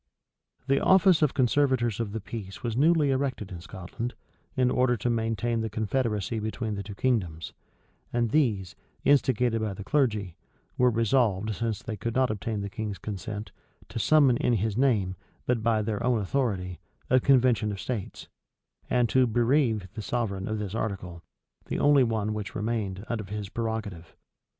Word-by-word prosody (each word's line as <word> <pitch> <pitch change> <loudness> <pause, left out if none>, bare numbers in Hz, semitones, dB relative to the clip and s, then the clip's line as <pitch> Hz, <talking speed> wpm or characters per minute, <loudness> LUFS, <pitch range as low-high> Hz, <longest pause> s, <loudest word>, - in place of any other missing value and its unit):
The 135 +1 +2
office 190 -3 +5
of 150 -3 +2
conservators 130 -4 +2
of 115 -3 -2
the 110 - -3
peace 100 -2 -8
was 115 -2 -2
newly 150 +1 +4
erected 130 -7 -2
in 85 -2 -7
Scotland, 95 +7 -6 0.4
in 125 -2 +2
order 125 -1 +2
to 120 +3 0
maintain 115 0 0
the 110 - -2
confederacy 110 0 -1
between 110 +1 -3
the 100 - -3
two 100 0 -8
kingdoms; 95 -10 -1 0.6
and 120 -2 0
these, 110 - +1 0.3
instigated 125 -5 +3
by 105 -3 -2
the 100 - -7
clergy, 105 - 0 0.4
were 125 0 +4
resolved, 110 -3 +1
since 115 -1 -3
they 110 -5 -5
could 115 +4 -3
not 130 -2 +3
obtain 110 0 -3
the 100 - -3
king's 105 0 -4
consent, 105 +3 -6 0.4
to - - -4
summon 135 +2 +5
in 120 - +1
his 110 -1 0
name, 105 -8 +1 0.3
but 120 -2 +1
by 110 -1 +2
their 110 +1 -2
own 120 -2 +2
authority, 95 - -1 0.3
a 130 - +6
convention 125 -5 +3
of 100 - -5
states; 115 -4 -5 0.6
and 125 -1 +3
to 130 +3 +4
bereave 120 -3 +2
their 110 - -5
sovereign 100 -4 -2
of 110 - -2
this 105 -2 -4
article, 95 -6 -4 0.5
the - - -2
only 145 -2 +5
one 110 -3 0
which 105 0 -5
remained, 105 -3 -2
of 110 -4 -4
his 105 -1 -4
prerogative. 110 -7 -4
110 Hz, 165 wpm, -27 LUFS, 100-125 Hz, 0.6 s, a